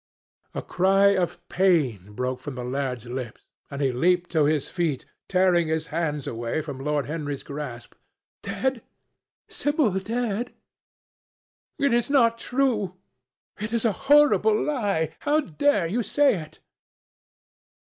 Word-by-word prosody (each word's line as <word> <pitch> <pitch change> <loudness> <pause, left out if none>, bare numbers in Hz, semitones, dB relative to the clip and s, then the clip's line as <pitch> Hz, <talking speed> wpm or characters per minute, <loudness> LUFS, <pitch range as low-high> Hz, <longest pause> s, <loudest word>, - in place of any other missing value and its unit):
A - - -3
cry 195 +2 +4
of 175 -1 -2
pain 135 - +1
broke 125 +2 -2
from 130 +1 -7
the 125 - -5
lad's 125 -2 -3
lips, 120 -1 -6 0.2
and 140 0 -3
he 135 - +2
leaped 175 +7 +1
to 155 -3 +3
his 150 -1 +1
feet, 165 -7 -2 0.2
tearing 180 -3 +3
his 160 0 -1
hands 150 -4 -1
away 115 +5 -3
from 145 -3 -7
Lord 145 +1 -1
Henry's 145 -2 -4
grasp. 140 -5 -7 0.5
"Dead! 265 -3 -2 0.7
Sibyl 290 -6 +1
dead! 230 +2 -3 1.2
It 280 -3 +2
is 240 +1 +1
not 230 -5 +3
true! 230 -8 0 0.6
It 210 +2 -4
is 235 0 0
a 225 - +4 0.2
horrible 220 -8 +5
lie! 200 - 0
How 295 +1 +2
dare 195 - +1
you 210 +9 -1
say 275 +5 +3
it?" 155 0 -12
175 Hz, 135 wpm, -25 LUFS, 145-225 Hz, 1.2 s, horrible